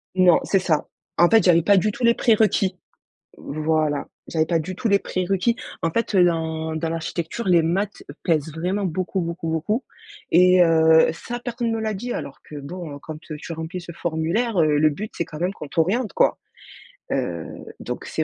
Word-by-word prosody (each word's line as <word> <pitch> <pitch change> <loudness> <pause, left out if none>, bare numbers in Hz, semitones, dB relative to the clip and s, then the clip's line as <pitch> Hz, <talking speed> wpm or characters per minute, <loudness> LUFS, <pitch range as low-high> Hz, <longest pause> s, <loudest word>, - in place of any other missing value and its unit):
Non, 180 -2 +5
c'est 195 - +2
ça. 160 -5 0 0.3
En 175 0 +5
fait, 225 -3 +5
j'avais 170 -2 +5
pas 200 +4 +4
du 210 +3 +2
tout 240 - -7
les 235 - +6
prérequis. 215 -5 +2 0.6
Voilà. 155 -1 -1 0.2
J'avais 160 -1 +1
pas 170 -1 +1
du 175 +4 -4
tout 225 +5 -2
les 200 -1 +4
prérequis. 195 +5 0 0.3
En 165 - +1
fait, 230 +4 -1
heu, 185 -2 +6
dans 160 -2 -1
dans 160 +1 -2
l'architecture, 165 +5 -4
les 175 -3 +5
maths 195 +5 -1 0.2
pèsent 160 -3 0
vraiment 180 +6 -2
beaucoup, 185 +2 -2
beaucoup, 170 -1 -4
beaucoup 210 - -1 0.5
et 180 +1 +6
heu, 160 -1 +5
ça, 240 +8 -6
personne 240 -1 -3
ne 225 - 0
me - - -3
l'a 220 -1 -2
dit, 240 +5 -4
alors 135 - -6
que, 150 - -11
bon, 155 +2 -7
heu, - - -8
quand 155 -1 -7
tu 155 +1 -8
remplis 160 +3 -5
ce 170 -1 -9
formulaire, 170 +8 -1
heu, 150 -1 +3
le 155 +1 +4
but, 210 +9 -6
c'est 170 - -1
quand 155 - -9
même 180 +2 0
qu'on 150 -7 -9
t'oriente, 195 - 0
quoi. - - +2 0.7
Heu, - - -2 0.3
donc - - -6
c'est - - -2
175 Hz, 195 wpm, -23 LUFS, 160-200 Hz, 0.7 s, les